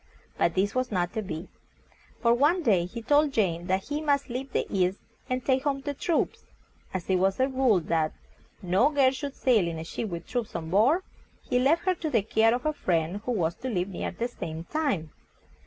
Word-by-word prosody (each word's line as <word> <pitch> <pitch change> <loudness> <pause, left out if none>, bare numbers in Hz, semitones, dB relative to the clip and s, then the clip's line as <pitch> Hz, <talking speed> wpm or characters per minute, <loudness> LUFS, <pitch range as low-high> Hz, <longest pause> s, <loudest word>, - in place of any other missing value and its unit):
But 165 - +1
this 195 +2 +1
was 255 0 0
not 180 -2 0
to 220 - -1
be, 175 -3 -6 0.8
for 235 0 +5
one 300 +8 +3
day 190 - +3
he 230 +6 -7
told 290 +4 +3
Jane 175 -6 0
that 190 +1 +1
he 295 +1 -1
must 285 -3 +1
leave 260 +2 -4
the - - 0
East, 185 0 +1 0.3
and 255 -1 -2
take 260 -1 +2
home 275 -2 0
the 285 +1 -3
troops. 330 +4 -1 0.5
As 185 -2 -4
it 190 - +3
was 190 +3 +1
a 260 - +4
rule 260 -7 +3
that 160 -1 0 0.5
no 190 +10 +3
girl 275 -3 +4
should 280 +1 -5
sail 225 -9 +3
in 165 -1 -3
a 160 - -5
ship 205 +6 -4
with 170 -1 -6
troops 240 -3 -3
on 160 -1 -4
board, 255 - +4 0.4
he 250 - +1
left 295 +8 +3
her 370 - +3
to 330 -3 -4
the 230 -8 +2
care 225 +2 +3
of 245 - -5
a 305 - +1
friend 175 - -1
who 250 - -1
was 170 -7 0
to 260 - -4
leave 185 -4 -1
near 185 - -3
the 230 +6 -3
same 165 -9 -6
time. 225 - -1
225 Hz, 220 wpm, -27 LUFS, 180-270 Hz, 0.8 s, for